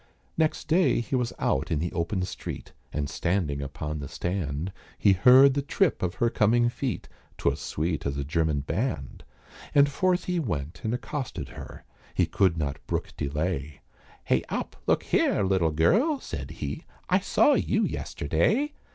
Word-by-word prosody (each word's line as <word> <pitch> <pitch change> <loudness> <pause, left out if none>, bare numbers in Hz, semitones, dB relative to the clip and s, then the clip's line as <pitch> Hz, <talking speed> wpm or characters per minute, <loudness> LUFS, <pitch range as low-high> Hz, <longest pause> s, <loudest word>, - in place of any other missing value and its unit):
Next 155 -1 0
day 165 -2 +3
he 120 +3 -2
was 125 -2 0
out 70 +1 0
in 80 - +1
the 85 +3 -2
open 90 +3 -1
street, 90 - -6 0.2
And 75 -1 -2
standing 80 -4 -1
upon 75 +2 -4
the 70 - -5
stand, 85 +1 -3 0.2
He 100 - +5
heard 130 +8 +7
the 140 - 0
trip 165 +4 +1
of 90 -1 -1
her 120 -1 +1
coming 120 +3 +3
feet, 125 +1 -3 0.3
'Twas - - 0
sweet 80 -1 -2
as 70 0 -2
a 70 - -1
German 80 -1 0
band. 75 - -3 0.5
And 140 0 +7
forth 180 +4 +1
he 180 -1 -1
went 85 - -3
and 110 - -1
accosted 125 +3 -5
her, - - -10 0.3
He - - +3
could 95 -4 +2
not 70 -3 -3
brook - - -2
delay, 75 -1 -3 0.4
"Hey - - +2
up, - - -3
look - - +3
here, - - +2
little 95 -4 +2
gurl," 225 - +3
said - - -6
he, - - -5 0.2
"I - - +3
saw - - +4
you - - +1
yesterday." 290 +2 0
95 Hz, 165 wpm, -27 LUFS, -, 0.5 s, heard